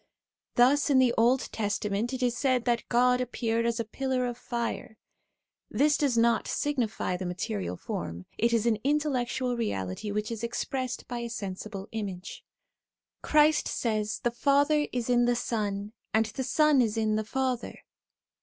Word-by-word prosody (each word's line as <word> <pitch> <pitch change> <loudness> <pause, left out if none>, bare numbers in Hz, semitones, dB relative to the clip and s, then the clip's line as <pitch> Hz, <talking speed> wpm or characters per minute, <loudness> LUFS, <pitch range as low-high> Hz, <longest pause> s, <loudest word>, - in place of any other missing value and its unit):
Thus 275 +5 +4
in 275 - +4
the 255 -2 +4
Old 245 +3 +4
Testament 210 +1 -1
it 260 -1 -3
is 245 -1 +1
said 255 -2 +1
that 240 -1 0
God 250 +1 +3
appeared 230 -2 -1
as 235 0 -1
a 230 - -1
pillar 260 +2 -1
of 245 -1 -3
fire; 235 -2 -4 0.7
this 295 +1 +3
does 275 -6 +1
not 230 0 +3
signify 245 -10 -1
the 185 0 -4
material 100 - -3
form, 85 +2 -5
it 235 +1 +1
is 230 -1 +2
an 230 -2 +3
in 280 +7 +2
tellectual 255 -4 -1
reality 100 - -3
which 210 +2 -2
is 230 -1 -5
expressed 255 +2 -3
by 240 0 -4
a 235 0 -4
sensible 200 -2 -6
image. 200 -4 -6 0.8
Christ 305 0 +4
says, 215 -2 -1
' - - -39
The 240 - +2
Father 285 +4 +2
is 245 -2 -2
in 240 -1 +3
the 245 0 +2
Son, 210 -3 -2 0.2
and 225 0 +4
the 245 +5 -4
Son 300 0 +4
is 220 -2 0
hi 225 -1 0
the 215 0 +1
Father.' 255 +2 -2
235 Hz, 170 wpm, -28 LUFS, 215-255 Hz, 0.8 s, Thus